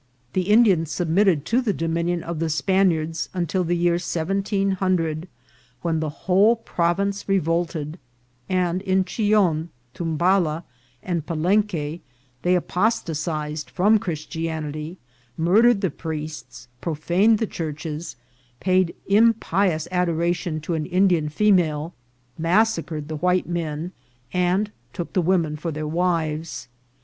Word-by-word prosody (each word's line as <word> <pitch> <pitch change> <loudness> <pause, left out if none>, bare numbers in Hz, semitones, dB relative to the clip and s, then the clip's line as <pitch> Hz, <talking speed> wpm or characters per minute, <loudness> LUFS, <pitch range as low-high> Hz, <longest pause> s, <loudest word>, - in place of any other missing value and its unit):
The 185 +1 -1
Indians 200 -8 +5
submitted 170 -1 +2
to 240 +7 +2
the 225 -5 0
dominion 170 +1 -1
of 170 -2 -4
the 165 0 0
Spaniards 165 -2 +1
until 180 +1 0
the 175 +1 0
year 170 0 +2
1700, 185 -2 0 0.6
when 165 -2 0
the 155 -1 -1 0.2
whole 195 +6 +5
province 200 -1 -1
revolted, 165 -3 0 0.5
and 180 -1 +1
in 190 -1 +1
Chillon, 195 -7 +1 0.2
Tumbala, 170 0 +1 0.4
and 175 -4 -2
Pa 165 - -2
lenque 170 -2 0 0.4
they 180 +1 +3
apostatized 160 -6 -1
fronl 205 +3 +4
Christianity, 160 0 -4 0.4
murdered 205 +6 +4
the 190 - 0
priests, 155 -1 -7
proijaned 175 +7 +2
the 225 - 0
churches, 155 -2 -5 0.4
paid 185 -2 +2
impious 200 -6 +2
adora 175 -1 +1
tion 165 -2 -4
to 165 +3 -3
an 155 -2 -2
Indian 180 -4 +2
female, 170 -3 +2 0.5
massacred 165 -4 +1
the 155 -1 -4
white 180 +3 +1
men, 165 -1 -3 0.4
and 180 +4 +1 0.2
took 175 -3 -5
the 185 - +2
women 170 -3 +1
for 165 +2 -4
their 155 0 -4
wives. 160 -4 -1
175 Hz, 120 wpm, -23 LUFS, 160-190 Hz, 0.6 s, Indians